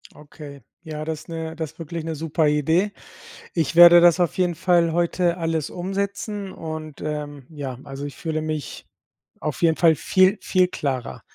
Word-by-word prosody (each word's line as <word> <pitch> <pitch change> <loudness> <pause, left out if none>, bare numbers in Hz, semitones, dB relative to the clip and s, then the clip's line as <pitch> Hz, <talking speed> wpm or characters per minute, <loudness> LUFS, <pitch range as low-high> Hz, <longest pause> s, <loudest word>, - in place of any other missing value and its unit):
Okay, 145 -1 -12 0.2
ja, 155 -2 -6
das 155 -1 -4
ist - - -17
'ne 160 -1 -5
das 160 -2 -5
ist 160 - -34
wirklich 165 0 -5
'ne 165 -1 -3
super 160 +1 0
Idee. 160 +7 +2 0.6
Ich 165 -2 -1
werde 175 0 +9
das 175 +1 +5
auf 175 -2 0
jeden 180 -2 +1
Fall 170 0 +2
heute 175 +1 +1
alles 165 -3 -2
umsetzen 200 +2 -4
und, 155 -3 -7
ähm, 145 -2 -5
ja, 140 -5 -6
also 140 0 -7
ich 145 - -7
fühle 160 -2 -3
mich 155 -1 -5 0.5
auf 150 - -4
jeden 165 -2 +3
Fall 165 -2 +5
viel, 185 +6 +3
viel 185 -1 +2
klarer. 135 -8 -4
160 Hz, 175 wpm, -23 LUFS, 150-175 Hz, 0.6 s, werde